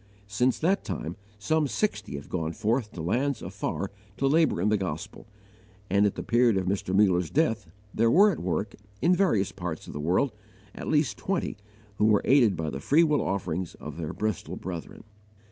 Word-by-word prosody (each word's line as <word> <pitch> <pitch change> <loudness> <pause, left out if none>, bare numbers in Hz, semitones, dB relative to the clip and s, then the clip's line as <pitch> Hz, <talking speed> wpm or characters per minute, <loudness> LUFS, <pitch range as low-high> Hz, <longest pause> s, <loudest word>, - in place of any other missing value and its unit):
Since 120 +5 +1
that 185 +5 +1
time 85 -2 -4 0.2
some 150 +9 +1
sixty 205 - -2
have 70 - -7
gone 80 -2 -2
forth 115 +2 0
to 80 - -6
lands 125 - 0
afar 95 +1 -3 0.3
to 135 - 0
labour 155 - +3
in 100 +4 +2
the 105 - +3
gospel, 90 0 -5 0.6
and 100 +1 +4
at 100 - -2
the - - -4
period 120 -3 +3
of 95 - 0
Mr. 95 0 -1
Muller's 90 -4 +3
death 115 - +1 0.3
there 115 +1 +3
were 200 - +6
at 170 - -4
work, 95 +4 -2 0.3
in 180 +2 +5
various 150 - +2
parts 85 -3 -5
of - - -9
the 75 - -5
world, 90 - +2 0.4
at - - -7
least 150 -9 +1
twenty, 195 -2 -2 0.4
who 105 0 +5
are - - +2
aided 120 -9 +4
by 80 -1 -2
the 65 - -5
free 145 - +4
will 150 -3 +2
offerings 95 -2 -2
of 75 0 -9
their 80 -3 -4
Bristol 110 -4 -3
brethren. 85 -2 -7
105 Hz, 190 wpm, -27 LUFS, 90-135 Hz, 0.6 s, were